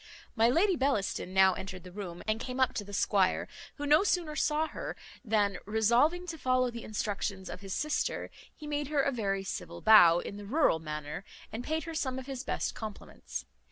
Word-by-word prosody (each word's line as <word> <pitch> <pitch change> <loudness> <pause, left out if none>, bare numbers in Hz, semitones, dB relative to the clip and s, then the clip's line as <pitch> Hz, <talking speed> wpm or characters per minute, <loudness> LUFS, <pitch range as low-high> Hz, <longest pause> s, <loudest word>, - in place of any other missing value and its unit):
My 230 0 +4
Lady 360 +8 +3
Bellaston 260 - 0
now 190 0 +5
entered 185 -1 -7
the 180 - -11
room, 180 -3 -7
and 215 0 +1
came 255 +1 -5
up 260 0 +3
to 205 - -3
the 205 - -11
squire, 195 -1 +2 0.3
who 290 - -4
no 300 +5 +5
sooner 345 -6 0
saw 305 +1 +1
her, - - -5 0.3
than, 205 -4 +1
resolving 235 +12 +3
to 325 -2 -6
follow 255 -1 +2
the 235 -1 -7
instructions 200 -2 -3
of 180 - -8
his 195 -1 -4
sister, 305 0 -1 0.2
he 305 - -10
made 295 -1 -2
her 290 -2 +1
a 280 - +1
very 195 -6 -1
civil 195 - -6
bow, 175 -6 +8
in 200 +3 -5
the 205 - -8
rural 265 - +3
manner, 150 +1 -5 0.3
and 230 +2 -5
paid 315 +3 -1
her 330 - -6
some 260 -5 -2
of 260 - -6
his 265 -1 -5
best - - -2
compliments. 215 -2 -7
230 Hz, 200 wpm, -30 LUFS, 195-290 Hz, 0.3 s, bow